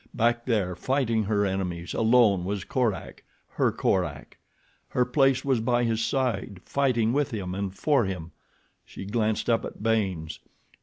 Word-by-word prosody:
Back 120 0 +1
there, 100 -7 0
fighting 115 -2 0
her 100 0 +1
enemies, 90 -3 -3
alone, 110 -5 +4
was 100 +1 -3
Korak—her 120 -6 -2
Korak. - - -1 0.5
Her 125 - +1
place 135 +1 +2
was 135 -4 +2
by 120 +1 +1
his 115 -1 0
side, 115 -9 -1
fighting 125 -5 +1
with 145 0 +1
him 95 -5 -4
and 100 0 -3
for 135 +4 +2
him. 90 -4 -5 0.5
She - - -9
glanced 110 +1 0
up 115 -1 +2
at - - -8
Baynes. 95 -8 -1
110 Hz, 145 wpm, -26 LUFS, 95-125 Hz, 0.5 s, alone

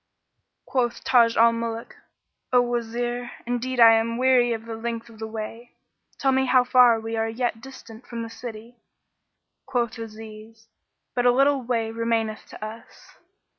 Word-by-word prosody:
Quoth 245 -3 -1
Taj 235 -2 +4
al 230 0 +6
Muluk, 230 0 -5 0.6
"O 250 - +5
Wazir, 240 0 -2 0.2
indeed 245 +1 -2
I 230 -1 +9
am 225 +1 +1
weary 250 -1 +4
of 225 -1 -3
the 230 -1 -6
length 230 0 -5
of 220 -2 -16
the 220 - -4
way. 225 +2 -8 0.4
Tell 270 - +2
me 265 0 +2
how 250 0 +5
far 250 -2 +5
we 225 +1 -5
are 225 0 0
yet 230 -1 -2
distant 250 -3 -12
from 235 -1 -5
the 230 - -7
city." 230 0 -9 0.9
Quoth 240 -3 -1
Aziz, 220 0 -11 0.4
"But 245 0 +2
a - - +7
little 275 +2 +3
way 230 -2 -1
remaineth 225 -1 -2
to 215 - -8
us." 225 +2 -12
230 Hz, 160 wpm, -24 LUFS, 225-245 Hz, 0.9 s, I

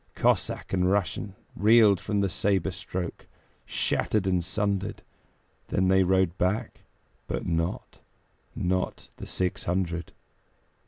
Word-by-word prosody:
Cossack - - +1
and 90 -1 +2
Russian 100 0 -1 0.2
Reeled 105 -2 +6
from 105 -1 -1
the 100 - +2
sabre 95 0 0
stroke, 90 -2 -5 0.4
Shattered 105 -3 0
and 90 -2 +1
sundered. 100 +1 -2 0.6
Then 95 0 +1
they 95 0 +5
rode 95 -1 +2
back, 105 +6 0 0.5
but - - -3
not 85 +1 -2 0.6
Not 90 +1 -1
the - - -8
six 90 -1 -2
hundred. 85 -2 -1
95 Hz, 115 wpm, -27 LUFS, 90-100 Hz, 0.6 s, Reeled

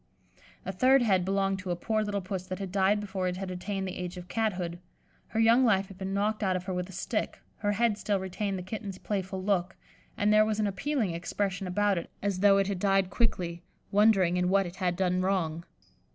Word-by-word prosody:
A - - -2
third 255 +7 +4
head 190 -5 +3
belonged 195 +1 0
to 185 0 -6
a 175 - +1
poor 215 +5 -1
little 205 -1 -2
Puss 185 0 -5
that 185 - -4
had 195 -2 -5
died 195 +2 +3
before 190 -2 -3
it 180 0 -2
had 190 -1 -4
attained 190 +1 -3
the 185 - -5
age 180 0 -5
of 180 0 -8
cathood; 180 -6 -2 0.5
her 220 - -3
young 230 +3 +5
life 195 -5 +3
had 195 -1 -12
been 190 0 -3
knocked 210 +2 0
out 190 -3 +1
of 180 - -2
her 185 0 -4
with 180 +1 -3
a - - -8
stick: 190 - -3 0.2
her 205 -1 0
head 225 -1 +1
still 205 -2 0
retained 190 +1 -3
the 180 - -5
kitten's 195 0 -6
playful 190 -2 -3
look, 190 -2 0 0.4
and 210 +1 +3
there 215 0 +7
was 215 0 -1
an 215 - +2
appealing 215 - -1
expression 195 +3 -2
about 200 0 +1
it - - -9
as 200 -2 0
though 200 0 +6
it 195 - +3
had 195 -2 -2
died 195 -1 +2
quickly, 175 -7 -1 0.3
wondering 195 -4 +4
in 180 0 +1
what 195 0 +3
it 175 +1 -8
had 180 -1 0
done 185 0 +1
wrong. 175 -4 -1
195 Hz, 225 wpm, -29 LUFS, 185-205 Hz, 0.5 s, there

